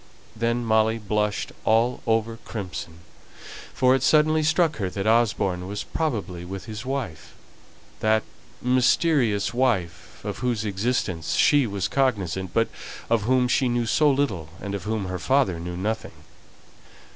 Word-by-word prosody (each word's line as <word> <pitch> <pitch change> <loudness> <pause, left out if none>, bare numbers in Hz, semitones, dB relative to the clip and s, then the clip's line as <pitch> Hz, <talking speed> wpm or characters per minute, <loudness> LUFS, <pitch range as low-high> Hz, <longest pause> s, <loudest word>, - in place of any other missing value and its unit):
Then 115 +2 0
Molly 110 0 +3
blushed 105 -1 -1
all 115 +3 +2
over 115 0 +1
crimson, 90 -7 -7 0.7
for 130 0 +3
it 135 - +2
suddenly 155 +3 +4
struck 160 0 +2
her 95 -4 -2
that 95 +2 -4
Osborne 100 -5 +1
was 100 +1 -4
probably 105 - -3
with 95 +2 -7
his 110 0 -6
wife 90 - -4 0.6
that 110 0 +2 0.4
mysterious 125 -3 +2
wife, 120 -9 -1
of - - -4
whose 120 -3 -1
existence 100 - -1
she 145 -4 +4
was 100 -3 -2
cognizant, 95 -9 0
but 115 +4 +1 0.4
of 115 -3 +2
whom 130 -1 +3
she 130 0 +2
knew 120 -1 0
so 150 +6 +3
little, 130 - 0
and 100 -1 -5
of 100 -3 -4
whom 110 -2 -2
her 90 0 -4
father 130 -11 +2
knew 85 +1 -5
nothing. 110 +4 -4
110 Hz, 145 wpm, -24 LUFS, 95-125 Hz, 0.7 s, suddenly